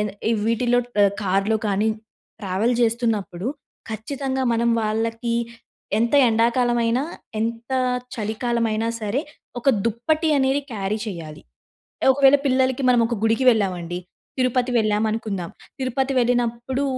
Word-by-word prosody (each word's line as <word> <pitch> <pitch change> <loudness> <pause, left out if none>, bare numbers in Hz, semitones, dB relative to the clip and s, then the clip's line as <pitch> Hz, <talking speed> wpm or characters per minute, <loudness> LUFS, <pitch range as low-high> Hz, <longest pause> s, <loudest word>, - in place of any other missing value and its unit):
ఏద 210 - 0 0.2
ఎ - - +3
వీటిలో 240 +1 +2 0.2
ఆహ్, 200 0 +4
కారులో 195 +3 +1
కానీ 205 +2 +1 0.5
ట్రావెల్ 205 +5 0
చేస్తున్నప్పుడు 225 -5 0 0.4
ఖచ్చితంగా 265 +4 -3
మనం 235 +1 +1
వాళ్ళకి 225 +2 -1 0.6
ఎంత 235 +4 +1
ఎండాకాలమైన, 235 +1 +2 0.4
ఎంత 230 +2 -3 0.5
చలికాలమైనా 225 0 -1
సరే! 215 +5 -1 0.4
ఒక 275 - 0 0.2
దుప్పటి 310 +9 0
అనేది 270 +1 +2
క్యారీ 210 -1 -2
చేయాలి. 165 -6 -7 0.7
ఒకవేళ 275 +1 +6
పిల్లలకి 260 0 +2
మనం 245 - +4
ఒక 235 - -2
గుడికి 225 +4 +2
వెళ్ళామండి. 180 -6 -1 0.4
తిరుపతి 255 0 +1
వెళ్ళామనుకుందాం. 215 -4 -1 0.3
తిరుపతి 265 +1 -1
వెళ్ళినప్పుడు 245 +2 0
230 Hz, 110 wpm, -22 LUFS, 215-250 Hz, 0.7 s, ఒకవేళ